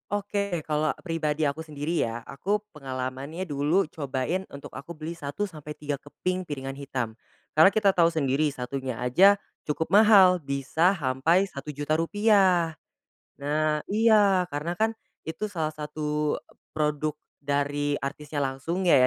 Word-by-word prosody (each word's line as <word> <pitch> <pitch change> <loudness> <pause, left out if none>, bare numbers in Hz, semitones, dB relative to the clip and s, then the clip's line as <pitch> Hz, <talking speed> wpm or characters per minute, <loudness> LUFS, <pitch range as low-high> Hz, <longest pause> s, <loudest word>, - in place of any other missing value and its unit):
Oke, 200 -3 -1
kalau 155 0 +1
pribadi 155 -3 -1
aku 145 +3 -3
sendiri 155 +1 -2
ya, 115 0 -3
aku 200 +9 -1 0.2
pengalamannya 135 +5 -5
dulu, 150 +5 +1
cobain 140 +5 -2
untuk 140 - -8
aku 155 - -8
beli 160 +1 -6
1 155 +6 -3
sampai 150 -4 -10
3 150 -1 -3
keping 185 +6 -4
piringan 135 -4 -5
hitam. 130 -5 -4 0.4
Karena 160 +6 +7
kita 200 -3 +3
tahu 170 -1 +5
sendiri, 150 -1 +1
satunya 130 -1 -4
aja 185 +12 +5 0.2
cukup 155 +2 -2
mahal, 200 -3 +7
bisa 140 +6 +1
sampai 165 +3 +2
Rp1.000.000 145 -2 -3
rupiah. 185 -2 +3 0.7
Nah 150 +1 +1
iya, 205 -4 +4
karena 165 +4 -3
kan 220 +1 +2 0.3
itu 165 +7 -4
salah 160 -5 -2
satu 150 0 -2
e - - -16 0.2
produk 150 0 -1 0.2
dari 145 0 0
artisnya 145 +2 -5
langsung 140 +7 -2
ya 175 - +5
155 Hz, 140 wpm, -27 LUFS, 140-180 Hz, 0.7 s, Karena